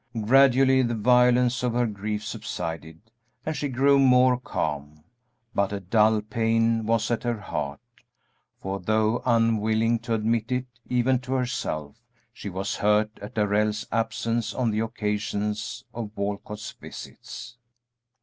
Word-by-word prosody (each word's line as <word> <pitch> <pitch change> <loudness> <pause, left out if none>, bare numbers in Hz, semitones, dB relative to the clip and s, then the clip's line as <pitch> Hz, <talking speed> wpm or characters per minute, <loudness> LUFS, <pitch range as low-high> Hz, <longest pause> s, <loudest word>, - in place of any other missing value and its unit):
Gradually 130 +3 +5
the 120 -2 0
violence 125 +2 +4
of 125 -2 0
her 120 0 +2
grief 105 0 -4
subsided 80 +5 -6 0.3
and 155 - -2
she 145 - -2
grew 140 +2 +4
more 125 -1 +5
calm, 75 - -4 0.5
but 100 0 +1
a 100 - -3
dull 105 +3 +3
pain 115 +1 +1
was 115 0 +1
at 115 - 0
her 120 -2 -2
heart, 70 -8 -4 0.8
for 95 +1 -4
though 110 +4 +1
unwilling 115 0 +2
to 115 0 -2
admit 115 +2 0
it 125 0 0 0.2
even 125 +1 +2
to 130 +1 -5
herself, 115 - -3 0.3
she 105 - -7
was 95 +1 -3
hurt 105 +1 +1
at 105 +5 -9
Darrell's 105 0 +1
absence 115 0 -1
on 120 -3 +1
the 105 - -1
occasions 105 0 -2
of 110 -2 -6
Walcott's 105 +1 -4
visits. 120 0 -10
110 Hz, 135 wpm, -25 LUFS, 105-120 Hz, 0.8 s, Gradually